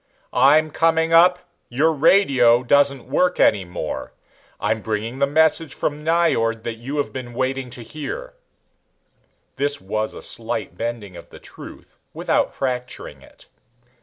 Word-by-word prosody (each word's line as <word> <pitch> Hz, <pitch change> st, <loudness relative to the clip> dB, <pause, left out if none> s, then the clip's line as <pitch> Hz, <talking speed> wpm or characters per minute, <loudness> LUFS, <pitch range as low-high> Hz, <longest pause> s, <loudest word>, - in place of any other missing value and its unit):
"I'm 150 Hz, +5 st, +4 dB
coming 165 Hz, +1 st, +1 dB
up. 180 Hz, +2 st, +6 dB, 0.3 s
Your 150 Hz, +7 st, +2 dB
radio 135 Hz, -7 st, +4 dB
doesn't 140 Hz, 0 st, +2 dB
work 180 Hz, 0 st, +1 dB
any 100 Hz, -3 st, +4 dB
more. 90 Hz, -3 st, -6 dB, 0.5 s
I'm 110 Hz, 0 st, -1 dB
bringing 110 Hz, +5 st, -4 dB
the 140 Hz, -, +3 dB
message 160 Hz, +2 st, +2 dB
from 150 Hz, 0 st, -3 dB
Nyjord 155 Hz, -9 st, +1 dB
that 115 Hz, -1 st, -5 dB
you 135 Hz, +5 st, -5 dB
have 145 Hz, -, -2 dB
been 120 Hz, -2 st, -7 dB
waiting 130 Hz, 0 st, -2 dB
to 120 Hz, -1 st, -6 dB
hear." 325 Hz, -, -7 dB, 1.2 s
This 145 Hz, +1 st, 0 dB
was 110 Hz, +3 st, -3 dB
a -, -, -9 dB
slight -, -, -5 dB
bending 115 Hz, -3 st, -5 dB
of -, -, -12 dB
the -, -, -13 dB
truth -, -, -13 dB, 0.2 s
without -, -, 0 dB
fracturing 125 Hz, -2 st, -5 dB
it. -, -, -18 dB
135 Hz, 140 wpm, -21 LUFS, 115-155 Hz, 1.2 s, up